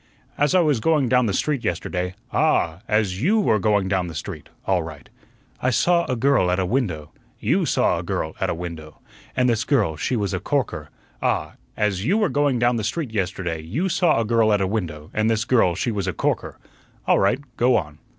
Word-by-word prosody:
"As 145 Hz, +5 st, +2 dB
I 185 Hz, -, +6 dB
was 150 Hz, -7 st, +2 dB
going 150 Hz, -1 st, +2 dB
down 125 Hz, -2 st, +3 dB
the -, -, 0 dB
street 145 Hz, +1 st, -1 dB
yesterday 90 Hz, +1 st, -2 dB
" -, -, -36 dB
"Ah! 90 Hz, -, +2 dB
as 105 Hz, -3 st, 0 dB
YOU 205 Hz, -, +3 dB
were 110 Hz, -, +2 dB
going 100 Hz, -1 st, +2 dB
down 95 Hz, -2 st, 0 dB
the 80 Hz, -, -8 dB
street 70 Hz, -, -7 dB, 0.2 s
all 95 Hz, -2 st, +2 dB
right." 80 Hz, -4 st, -9 dB, 0.5 s
"I 130 Hz, -, +2 dB
saw 170 Hz, +8 st, +2 dB
a 130 Hz, -, -1 dB
girl 125 Hz, -6 st, +2 dB
at 90 Hz, -, +1 dB
a 95 Hz, -, 0 dB
window 90 Hz, -, -2 dB
" -, -, -35 dB
"YOU -, -, +1 dB
saw -, -, +2 dB
a -, -, -5 dB
girl 80 Hz, -, -3 dB
at -, -, +1 dB
a -, -, -1 dB
window." 80 Hz, -3 st, -8 dB, 0.4 s
"And 125 Hz, -1 st, +3 dB
this 115 Hz, -2 st, +1 dB
girl 105 Hz, -, +1 dB
she 125 Hz, -, -1 dB
was 100 Hz, -5 st, -1 dB
a -, -, -1 dB
corker -, -, -2 dB, 0.2 s
" -, -, -34 dB
"Ah! -, -, 0 dB, 0.2 s
as 100 Hz, -3 st, 0 dB
YOU 185 Hz, -, +2 dB
were 210 Hz, -5 st, +2 dB
going 145 Hz, -3 st, +1 dB
down 120 Hz, 0 st, +2 dB
the 110 Hz, -, -2 dB
street 130 Hz, +2 st, -3 dB
yesterday 90 Hz, -4 st, -2 dB
YOU 130 Hz, -, -2 dB
saw 170 Hz, -7 st, +2 dB
a 115 Hz, -, 0 dB
girl 115 Hz, -1 st, +3 dB
at 105 Hz, -, +3 dB
a 95 Hz, -, +1 dB
window, 85 Hz, -7 st, -4 dB
and 110 Hz, +1 st, +1 dB
this 110 Hz, 0 st, +1 dB
girl 105 Hz, -9 st, +3 dB
she 120 Hz, -, -1 dB
was 100 Hz, -4 st, -2 dB
a -, -, -1 dB
corker. -, -, -2 dB, 0.5 s
All -, -, +4 dB
right, 100 Hz, +5 st, +3 dB, 0.2 s
go 120 Hz, +1 st, +3 dB
on." 75 Hz, -5 st, -5 dB
110 Hz, 230 wpm, -23 LUFS, 90-130 Hz, 0.5 s, I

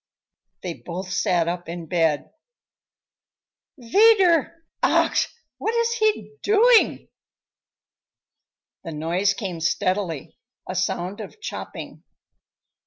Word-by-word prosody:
They 180 Hz, -2 st, -3 dB
both 185 Hz, +2 st, -6 dB
sat 180 Hz, -4 st, +1 dB
up 175 Hz, 0 st, -4 dB
in 170 Hz, 0 st, -6 dB
bed. 160 Hz, -4 st, 0 dB, 1.5 s
"Wieder! 340 Hz, -, +4 dB, 0.2 s
Ach, -, -, +3 dB, 0.3 s
What 450 Hz, -, -1 dB
is 465 Hz, 0 st, +2 dB
he 435 Hz, 0 st, +1 dB
doing?" 445 Hz, +3 st, +4 dB, 1.8 s
The 165 Hz, -, -6 dB
noise 175 Hz, +6 st, 0 dB
came 185 Hz, -5 st, -5 dB
steadily, 170 Hz, -3 st, -1 dB, 0.3 s
a -, -, -4 dB
sound 185 Hz, +2 st, -2 dB
of 215 Hz, -, -10 dB
chopping. 430 Hz, -, -7 dB
190 Hz, 95 wpm, -23 LUFS, -, 1.8 s, Wieder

